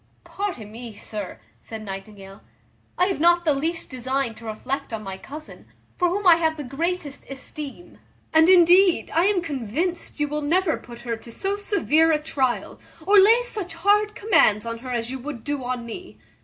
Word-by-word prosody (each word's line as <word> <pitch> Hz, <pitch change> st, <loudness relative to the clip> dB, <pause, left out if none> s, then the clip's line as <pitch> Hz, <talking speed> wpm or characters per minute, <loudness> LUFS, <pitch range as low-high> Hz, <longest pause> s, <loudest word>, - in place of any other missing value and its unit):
"Pardon, 350 Hz, -, -5 dB
me, 230 Hz, -1 st, -9 dB
sir," 205 Hz, -, -6 dB, 0.2 s
said 220 Hz, -, -8 dB
Nightingale, 195 Hz, 0 st, -9 dB, 0.6 s
"I 360 Hz, -, +4 dB
have 380 Hz, -3 st, -1 dB
not 345 Hz, +2 st, +4 dB
the 305 Hz, -, +4 dB
least 320 Hz, +4 st, -3 dB
design 260 Hz, -1 st, -1 dB
to 230 Hz, -, -13 dB
reflect 260 Hz, +6 st, -4 dB
on 220 Hz, -1 st, -4 dB
my 195 Hz, -1 st, -5 dB
cousin, 300 Hz, +10 st, -11 dB, 0.3 s
for 355 Hz, -1 st, +2 dB
whom 400 Hz, +3 st, -2 dB
I 345 Hz, -2 st, +8 dB
have 320 Hz, -1 st, 0 dB
the 295 Hz, -, -5 dB
greatest 290 Hz, +2 st, -4 dB
esteem; 280 Hz, +4 st, -8 dB, 0.3 s
and 320 Hz, +2 st, +6 dB
indeed 360 Hz, 0 st, +5 dB
I 335 Hz, +3 st, +3 dB
am 390 Hz, -3 st, +2 dB
convinced 310 Hz, -, -3 dB
you 295 Hz, -, +1 dB
will 300 Hz, +1 st, -3 dB
never 330 Hz, +3 st, +2 dB
put 240 Hz, 0 st, -12 dB
her 235 Hz, -1 st, -3 dB
to 230 Hz, +1 st, -12 dB
so 390 Hz, -, -2 dB
severe 325 Hz, -6 st, +2 dB
a 310 Hz, -, +4 dB
tryal, 285 Hz, -5 st, -2 dB, 0.3 s
or 405 Hz, +2 st, +7 dB
lay 450 Hz, +5 st, +6 dB
such 410 Hz, -8 st, -4 dB
hard 415 Hz, +4 st, +2 dB
commands 225 Hz, -, +3 dB
on 230 Hz, 0 st, -4 dB
her 255 Hz, +2 st, -8 dB
as 240 Hz, -1 st, -2 dB
you 265 Hz, -, -5 dB
would 260 Hz, -3 st, -7 dB
do 285 Hz, -2 st, -3 dB
on 245 Hz, -1 st, -3 dB
me. 360 Hz, +11 st, -9 dB
295 Hz, 185 wpm, -24 LUFS, 235-355 Hz, 0.6 s, I